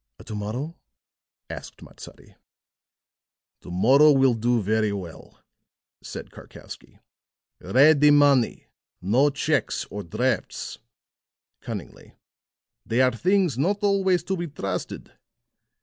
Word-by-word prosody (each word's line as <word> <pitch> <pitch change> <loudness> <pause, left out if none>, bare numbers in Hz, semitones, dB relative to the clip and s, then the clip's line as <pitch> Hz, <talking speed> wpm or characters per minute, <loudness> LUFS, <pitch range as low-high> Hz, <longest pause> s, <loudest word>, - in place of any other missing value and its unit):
"To 110 - -8
morrow?" 120 +11 -5 0.7
asked - - -9
Matsadi. - - -14 1.3
"To - - -12
morrow 130 +12 +5
will 135 -2 +4
do 120 +1 0
very 110 +1 0
well," 95 -5 -9 0.6
said - - -9
Karkowsky. - - -13 0.6
"Ready 145 +2 +4
money 145 -4 +3 0.3
no 120 +10 +2
checks, 145 -2 -1
or 105 - -5
drafts," 115 +6 -3 0.8
cunningly. - - -9 0.7
"They 115 - -1
are 130 0 +4
things 180 - +1
not 200 +8 0
always 190 -4 +2
to 190 +2 -2
be 175 -1 -4
trusted. 100 - -6
135 Hz, 100 wpm, -24 LUFS, 110-155 Hz, 1.3 s, morrow